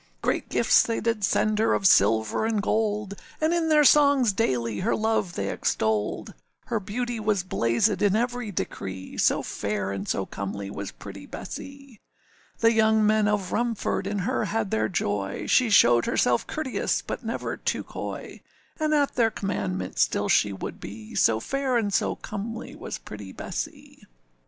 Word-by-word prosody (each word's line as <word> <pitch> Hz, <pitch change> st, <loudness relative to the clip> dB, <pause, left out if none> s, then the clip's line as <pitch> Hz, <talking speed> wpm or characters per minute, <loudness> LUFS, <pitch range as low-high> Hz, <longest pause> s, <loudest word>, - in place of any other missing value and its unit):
Great -, -, -1 dB
gifts -, -, +4 dB
they 230 Hz, -, -1 dB
did 225 Hz, -2 st, -1 dB
send 215 Hz, +2 st, +2 dB
her 220 Hz, -, +3 dB
of 195 Hz, -, -2 dB
silver 110 Hz, -, +4 dB
and 220 Hz, -1 st, +1 dB
gold, 210 Hz, -2 st, 0 dB, 0.3 s
And 315 Hz, +2 st, +2 dB
in 335 Hz, -2 st, +1 dB
their 305 Hz, -1 st, +5 dB
songs 280 Hz, -6 st, +5 dB
daily 120 Hz, -, 0 dB
her 220 Hz, -, +1 dB
love 220 Hz, -5 st, 0 dB
they 100 Hz, -, -2 dB
extolled: 110 Hz, -1 st, -1 dB, 0.3 s
Her 225 Hz, -, -1 dB
beauty 235 Hz, +4 st, -3 dB
was 210 Hz, -3 st, 0 dB
blazèd 185 Hz, -, +1 dB
in 205 Hz, -1 st, +3 dB
every 245 Hz, 0 st, -1 dB
decree, 95 Hz, -, -5 dB
So -, -, +3 dB
fair 100 Hz, -1 st, -3 dB
and 100 Hz, +1 st, -4 dB
so 95 Hz, -, 0 dB
comely 100 Hz, 0 st, -5 dB
was 100 Hz, 0 st, -5 dB
pretty 100 Hz, -1 st, -10 dB
Bessee. 275 Hz, -5 st, -9 dB, 0.6 s
The 230 Hz, 0 st, +6 dB
young 220 Hz, -1 st, +4 dB
men 215 Hz, 0 st, +3 dB
of 205 Hz, -3 st, 0 dB
Rumford 230 Hz, -4 st, -1 dB
in 205 Hz, +1 st, -2 dB
her 250 Hz, -2 st, 0 dB
had 215 Hz, -1 st, -2 dB
their 110 Hz, 0 st, +1 dB
joy, 100 Hz, -1 st, -2 dB
She 250 Hz, -2 st, +3 dB
showed 120 Hz, -, +5 dB
herself 120 Hz, -1 st, +1 dB
courteous, 310 Hz, -5 st, -1 dB
but -, -, -5 dB
never -, -, -3 dB
too -, -, -2 dB
coy, -, -, -7 dB, 0.4 s
And 310 Hz, 0 st, +2 dB
at 285 Hz, -2 st, +2 dB
their 230 Hz, -2 st, +3 dB
commandment 95 Hz, -, -3 dB
still -, -, +1 dB
she 105 Hz, -, +3 dB
would 95 Hz, -, -6 dB
be, 105 Hz, +2 st, -9 dB
So 110 Hz, -1 st, +3 dB
fair 270 Hz, -, -1 dB
and 205 Hz, -4 st, -1 dB
so -, -, +1 dB
comely 225 Hz, +3 st, -6 dB
was -, -, -6 dB
pretty 100 Hz, -2 st, -10 dB
Bessee. -, -, -6 dB
210 Hz, 165 wpm, -26 LUFS, -, 0.6 s, The